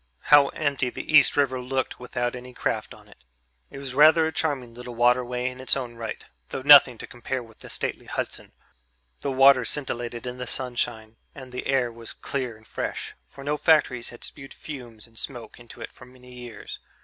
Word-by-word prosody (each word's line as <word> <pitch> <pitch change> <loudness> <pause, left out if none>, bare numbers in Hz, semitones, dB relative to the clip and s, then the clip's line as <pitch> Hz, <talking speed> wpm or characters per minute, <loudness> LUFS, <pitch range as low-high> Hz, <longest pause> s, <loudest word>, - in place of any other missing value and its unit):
How 145 -1 +9
empty 140 -4 -1
the 155 - -6
East 150 - +6
River 130 -3 +2
looked 130 +1 -2
without 120 0 -3
any 125 0 -10
craft - - -2
on - - -18
it! - - -20 0.5
It - - -10
was 135 -2 -5
rather 155 +3 +6
a 160 - -1
charming 135 -8 -2
little 125 0 -9
waterway 125 +1 +2
in 130 0 -6
its 130 - +3
own 125 -3 -5
right, 115 -1 -6 0.2
though 130 - -5
nothing 140 -4 +9
to - - -7
compare 125 +1 -5
with 110 -1 -18
the - - -11
stately - - -4
Hudson. - - -5 0.7
The 140 - -2
water 135 -1 +6
scintillated 120 -2 -4
in 125 0 -6
the 125 - -5
sunshine 120 -3 -3 0.2
and 130 -2 -10
the 125 - -5
air 130 -3 +1
was 115 0 -8
clear 125 -5 -4
and 110 - -22
fresh, - - -4
for 140 - -12
no 145 +1 -1
factories 145 -7 +3
had 120 - -13
spewed 135 -1 -7
fumes 120 -7 -9
and 115 -1 -9
smoke 120 -4 -6
into 120 0 -13
it - - -7
for - - -14
many 125 0 -16
years. 120 -4 -9
125 Hz, 195 wpm, -25 LUFS, 120-135 Hz, 0.7 s, How